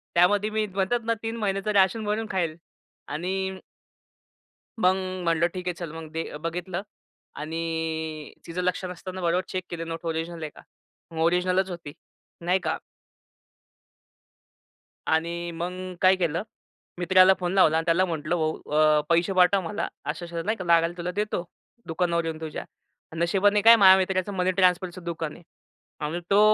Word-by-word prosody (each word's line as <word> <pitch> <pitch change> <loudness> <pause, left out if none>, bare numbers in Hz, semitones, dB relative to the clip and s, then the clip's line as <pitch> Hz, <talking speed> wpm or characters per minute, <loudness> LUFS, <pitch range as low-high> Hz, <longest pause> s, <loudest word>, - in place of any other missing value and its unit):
त्यामध्ये 205 +4 +4
मी 215 0 0
म्हणतात 195 +5 +1
ना 230 - +2
3 225 +1 -3
महिन्याचं 200 0 -1
राशन 200 +3 +3
भरून 210 +2 -1
खाईल. 170 -4 -1 0.5
आणि 190 +4 -3 1.2
मग 185 0 +4 0.3
म्हटलं 170 0 +2
ठीक 180 -1 -6
आहे 180 - 0
चल 170 -3 -7
मग 160 -1 -9
ते 165 -2 -4
बघितलं 175 +3 -4 0.6
आणि 160 -1 -3
तिचं 175 +2 -3
लक्ष 180 +1 0
नसताना 185 +1 -7
बरोबर 175 +2 +1
चेक 185 -1 -3
केले 165 -1 -4
नोट 165 0 -6
ओरिजिनल 165 0 -3
आहे 155 - -3
का? - - -13 0.5
मग 160 - -6
ओरिजिनलच 180 +2 +2
होती. 170 -5 -7 0.5
नाही 180 +2 +2
का? 160 - -1 2.3
आणि 170 +2 0
मग 170 +2 -4 0.3
काय 185 0 +6
केलं, 170 0 -1 0.6
मित्राला 185 +1 +6
फोन 180 0 -1
लावला 160 -5 +5
आणि 165 - -1
त्याला 170 +3 +3
म्हटलं, 165 0 -2
"भाऊ 155 -1 -1
अ, 155 0 +4
पैसे 170 +3 +3
पाठव 185 +1 +4
मला 205 +5 -3 0.2
अशा-अशा 170 +2 -4
नाही 220 +2 -1
का 185 - -6
लागायला 170 0 +4
तुला 175 +1 -3
देतो 210 -4 -1 0.4
दुकानावर 170 0 0
येऊन 160 -1 -4
तुझ्या." 155 -1 -5 0.5
नशिबाने 195 +5 +3
काय 230 +2 +9
माझ्या 190 -3 +8
मित्राचं 190 +1 0
मनी 185 0 +1
ट्रान्सफरचं 185 -1 +1
दुकान 165 -2 -4
आहे 175 - -15 0.6
आणि 165 +4 -2
तो 200 - +6
175 Hz, 155 wpm, -26 LUFS, 165-190 Hz, 2.3 s, काय